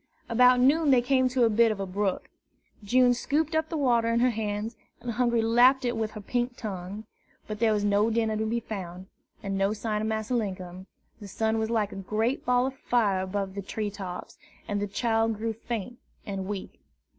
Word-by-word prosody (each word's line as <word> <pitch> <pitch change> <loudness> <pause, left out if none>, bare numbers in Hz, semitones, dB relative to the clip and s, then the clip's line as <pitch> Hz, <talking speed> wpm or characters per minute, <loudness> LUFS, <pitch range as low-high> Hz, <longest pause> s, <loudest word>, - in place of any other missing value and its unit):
About 250 +2 +5
noon 290 +5 +4
they 250 -3 +5
came 260 0 +3
to 250 -1 +2
a 230 - +5
bit 225 +1 +4
of 210 - -4
a 195 - -2
brook. 195 0 -2 0.6
June 245 +4 +4
scooped 300 +6 -1
up 315 0 0
the 325 - -2
water 240 -5 +2
in 230 0 +2
her 250 +1 +3
hands, 215 0 -3 0.2
and 245 - -4
Hungry 235 -1 +1
lapped 250 +4 +5
it 240 0 0
with 220 -1 -2
her 215 - -7
pink 245 +3 -2
tongue. 200 0 -6 0.4
But 215 -1 -6
there 225 -1 +3
was 210 -1 +1
no 205 +2 +3
dinner 225 -1 0
to 220 +1 -1
be 235 +2 0
found, 185 -4 -7 0.4
and 195 -1 -2
no 195 +2 +2
sign 210 0 -2
of 215 - -1
Massa 220 +2 -2
Linkum; 185 -4 -3 0.3
the 205 - -9
sun 220 +3 0
was 220 0 -1
like 220 -3 0
a - - -8
great 215 +6 -1
ball 250 0 +2
of 265 - -2
fire 210 -9 +1
above 190 0 -3
the 200 - -4
tree 205 +2 -4
tops, 190 -3 -7 0.3
and 205 -1 -1
the 205 - -1
child 225 +1 0
grew 225 +1 -2
faint 235 +1 -5 0.3
and 195 -2 -4
weak. 200 -2 -6
220 Hz, 210 wpm, -27 LUFS, 205-245 Hz, 0.6 s, About